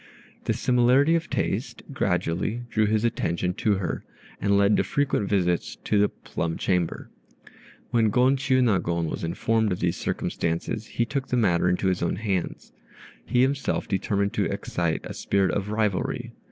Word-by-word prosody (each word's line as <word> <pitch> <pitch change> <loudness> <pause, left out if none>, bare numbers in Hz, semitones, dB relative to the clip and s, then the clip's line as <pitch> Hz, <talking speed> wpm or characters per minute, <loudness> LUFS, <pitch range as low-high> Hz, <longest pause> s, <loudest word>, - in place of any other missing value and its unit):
This - - -1
similarity 125 +5 +4
of 170 0 0
taste - - -2
gradually 105 +8 -1
drew 110 -1 +2
his 110 +2 +1
attention 90 -5 -1
to 105 +2 +1
her, 95 -2 -3 0.4
and 100 0 +3
led 100 +1 +4
to - - +3
frequent 140 -8 0
visits 90 -10 0
to 105 - +2
the 105 - +4
"plum 80 0 -4
chamber." 90 -3 -1 0.8
When 115 -2 +3
Gon 125 +5 +4
Chiûnagon 110 - +1
was - - -4
informed 110 +6 +1
of 90 - -2
these 85 -1 0
circumstances, 85 +6 -2
he 120 - -1
took 135 +2 -3
the 125 - 0
matter 90 -6 +3
into 90 +2 0
his 95 -1 +1
own 85 - 0
hands. 95 -3 -3 0.6
He 125 0 +3
himself 135 +1 0
determined 100 0 0
to - - +1
excite 85 -2 -2
a - - -6
spirit 100 -1 +1
of 100 0 -2
rivalry. 105 -3 -1
100 Hz, 160 wpm, -25 LUFS, 90-120 Hz, 0.8 s, similarity